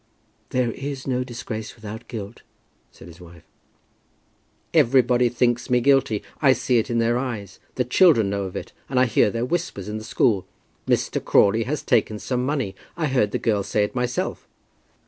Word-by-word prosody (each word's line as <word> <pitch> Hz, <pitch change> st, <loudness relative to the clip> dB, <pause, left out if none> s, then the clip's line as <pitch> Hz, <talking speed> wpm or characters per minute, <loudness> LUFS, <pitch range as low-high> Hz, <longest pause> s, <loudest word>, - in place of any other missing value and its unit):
"There 125 Hz, -2 st, 0 dB
is 135 Hz, +1 st, -6 dB
no 125 Hz, -1 st, 0 dB
disgrace 115 Hz, -3 st, -6 dB
without 110 Hz, -1 st, -9 dB
guilt," 110 Hz, -2 st, -7 dB, 0.5 s
said -, -, -14 dB
his 85 Hz, +1 st, -14 dB
wife. 85 Hz, -2 st, -14 dB, 1.3 s
"Everybody 125 Hz, -4 st, +4 dB
thinks 120 Hz, 0 st, 0 dB
me 125 Hz, 0 st, +4 dB
guilty. 130 Hz, -5 st, +2 dB, 0.2 s
I 135 Hz, -3 st, +6 dB
see 125 Hz, -2 st, +1 dB
it 110 Hz, -, -2 dB
in 120 Hz, -, 0 dB
their 115 Hz, +1 st, +2 dB
eyes. 110 Hz, -7 st, -5 dB, 0.2 s
The 125 Hz, -, 0 dB
children 135 Hz, -, +5 dB
know 100 Hz, -1 st, -2 dB
of 95 Hz, -, -7 dB
it, -, -, -6 dB, 0.2 s
and 130 Hz, -1 st, +1 dB
I 130 Hz, -, +5 dB
hear 110 Hz, -3 st, +3 dB
their 115 Hz, +3 st, -2 dB
whispers 155 Hz, -, -3 dB
in 105 Hz, +1 st, -4 dB
the -, -, -9 dB
school, 110 Hz, -3 st, +1 dB, 0.4 s
'Mr. -, -, 0 dB
Crawley 110 Hz, +3 st, +3 dB
has 145 Hz, +3 st, -3 dB
taken 105 Hz, -, +1 dB
some 125 Hz, +3 st, -2 dB
money.' 130 Hz, -8 st, -1 dB, 0.2 s
I 165 Hz, -, 0 dB
heard 125 Hz, -6 st, +2 dB
the -, -, -2 dB
girl 105 Hz, -3 st, 0 dB
say 105 Hz, +2 st, 0 dB
it 105 Hz, -, -3 dB
myself." 125 Hz, -1 st, -2 dB
120 Hz, 180 wpm, -23 LUFS, 105-130 Hz, 1.3 s, I